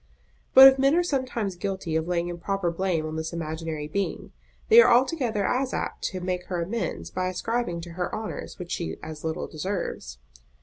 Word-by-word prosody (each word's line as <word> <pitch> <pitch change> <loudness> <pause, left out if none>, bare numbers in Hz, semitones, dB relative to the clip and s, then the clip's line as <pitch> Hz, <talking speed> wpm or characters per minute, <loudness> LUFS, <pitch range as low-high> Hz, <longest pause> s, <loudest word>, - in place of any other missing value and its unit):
But 265 0 +12
if 265 0 +5
men 275 +3 +4
are 350 - +3
sometimes 255 - -2
guilty 190 -3 -3
of 160 +1 0
laying 175 -1 0
improper 175 +1 -2
blame 170 -2 -1
on 155 0 -4
this 160 +1 -4
imaginary 160 -2 -4
being, 200 +6 -3 0.4
they 465 +1 +9
are - - +5
altogether 245 -5 +2
as 260 +1 0
apt - - -4
to 185 - -3
make 180 0 -3
her 180 -2 -2
amends 220 +6 -4
by 185 0 -1
ascribing 185 -1 -2
to 170 0 -9
her 180 +1 -3
honours 220 0 -6
which 180 -2 -8
she 170 - -3
as 155 -1 -8
little 160 0 -2
deserves. 155 - -4
185 Hz, 185 wpm, -26 LUFS, 165-230 Hz, 0.4 s, But